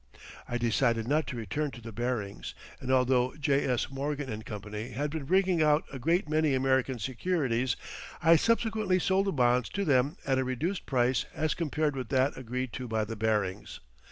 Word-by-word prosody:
I 120 - -1
decided 115 -1 +1
not 150 +1 +1
to 130 -1 -5
return 120 +8 -2
to 120 - -10
the 115 0 -8
Barings, 115 -3 -3 0.2
and 130 - -3
although 125 -1 +3
J.S. 140 -4 0
Morgan 135 -5 -3
& - - -22
Co. 105 -2 -5
had 120 +7 -3
been 155 -3 -4
bringing 185 +1 +3
out 150 0 +4
a 135 - -5
great 165 +6 +1
many 155 -2 +2
American 130 0 +1
securities 130 - 0 0.4
I 165 0 +6
subsequently 220 0 +2
sold 190 +2 +1
the - - +2
bonds 125 -4 +2
to 200 +1 -2
them 140 0 +2
at 135 -1 +2
a - - +2
reduced 150 +10 -2
price 125 -1 +2
as 155 0 0
compared 155 -3 -1
with 130 -3 -5
that 135 +1 +2
agreed 125 -1 -4
to 125 - -5
by 110 -1 0
the 115 - -5
Barings. 105 -2 -1
130 Hz, 185 wpm, -29 LUFS, 120-155 Hz, 0.4 s, I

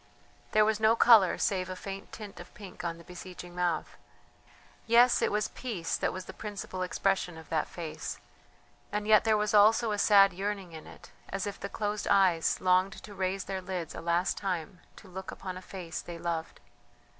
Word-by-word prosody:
There 215 0 +5
was 220 0 +1
no 220 +1 +4
colour 225 -6 +6
save 185 -2 0
a 185 - -4
faint 195 +1 -7
tint 210 -3 -9
of 175 - -11
pink 200 -4 -10
on 165 -1 -3
the 170 - -13
beseeching 180 0 -10
mouth. 175 -2 -2 0.9
Yes, 240 +2 +5
it - - +2
was 210 0 0
peace 210 -10 -3
that - - 0
was 185 0 -6
the - - -9
principal 205 -3 -6
expression 185 -1 0
of 160 - -12
that 160 - 0
face, 165 -3 -6 0.7
and 210 +1 -2
yet 215 0 +6
there 220 -1 +4
was 210 0 0
also 220 +2 +5
a 205 - -1
sad 200 -1 +6
yearning 195 -1 -4
in 160 -1 -10
it, - - -14 0.2
as 195 -1 -3
if 205 - -5
the 200 - -5
closed 210 0 -3
eyes 185 -5 +3
longed 185 +2 +3
to 215 -1 -11
raise 190 0 -2
their 190 -1 -4
lids 180 -2 -5
a - - -7
last 170 +2 0
time 180 -2 -3 0.2
to 205 - -14
look 190 +1 -8
upon 185 -1 -6
a 185 - -8
face 180 -3 -6
they 170 -1 -8
loved.... 165 -1 -4
190 Hz, 195 wpm, -30 LUFS, 180-210 Hz, 0.9 s, colour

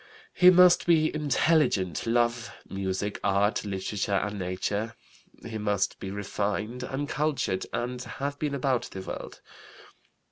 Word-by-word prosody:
He 180 - +7
must 180 -1 +6
be 160 -2 +4
intelligent, 150 - +1
love 120 0 +1 0.2
music, 95 +1 -3
art, 100 +1 +2
literature, 100 0 -2
and 105 +1 -1
nature. 100 +5 -2 0.5
He 110 -1 -5
must 105 -2 0
be 95 - -5
refined 105 +4 -3
and 135 +3 -3
cultured 150 -11 -1
and 125 +1 -3
have 140 +3 -5
been 145 -2 -1
about 130 -2 0
the 95 - -7
world. - - -7
110 Hz, 130 wpm, -27 LUFS, 100-140 Hz, 0.5 s, He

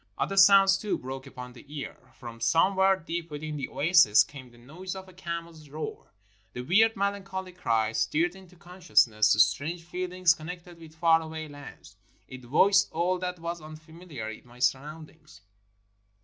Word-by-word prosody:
Other 195 - -2
sounds, 195 0 +6
too, 210 - -2
broke 130 +1 -8
upon 125 -2 -10
the 120 - -14
ear. 145 -1 -7 0.2
From 115 -2 -10
some 165 +11 +3
where 190 0 +4
deep 170 -1 -5
within 150 0 -6
the 140 -3 -4
oasis 155 - +5
came 130 -3 -12
the 120 - -20
noise 165 +10 -8
of 190 0 -9
a 185 - -15
camel's 170 -3 -7
roar. 155 +2 -7 0.4
The 125 - -5
weird, 220 - +3
melancholy 195 -2 -3
cry 115 -11 0
stirred 170 +9 0
into 185 -2 -16
conscious 175 - +2
ness 110 -2 +1
strange 145 +12 +1
feelings 180 0 +1
connected 175 +1 -10
with 160 -1 -14
far 165 0 +3
away 160 0 -7
lands, 145 -1 -13 0.3
it 130 0 -11
voiced 195 +10 +3
all 180 +3 0
that 180 0 -4
was 170 0 -5
unfamiliar 155 -4 -10
in 110 +2 -9
my 120 0 -17
surroundings. 150 0 -4
165 Hz, 165 wpm, -27 LUFS, 140-180 Hz, 0.4 s, sounds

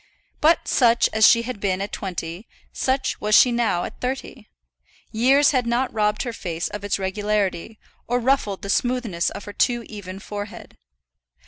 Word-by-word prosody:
But 325 +1 +3
such 240 -2 +3
as 220 -1 +6
she 230 0 +5
had 250 -3 -6
been 190 -2 -1
at 200 +1 -4
twenty, 180 +1 -5 0.3
such 265 0 -1
was 210 0 +3
she 250 - +7
now 235 -7 0
at - - -8
thirty. 260 +2 -5 0.6
Years 265 +6 +4
had 255 -4 0
not 245 +2 0
robbed 210 -1 0
her 240 -3 -4
face 170 -6 -4
of 210 -1 -7
its 205 - -1
regularity, 205 +1 -2 0.3
or 245 +1 +1
ruffled 235 -6 0
the 200 - -5
smoothness 240 -9 0
of 200 - -8
her 205 - -8
too 240 +1 +1
even 195 -3 -8
forehead. 205 +1 -8
215 Hz, 165 wpm, -23 LUFS, 200-245 Hz, 0.6 s, she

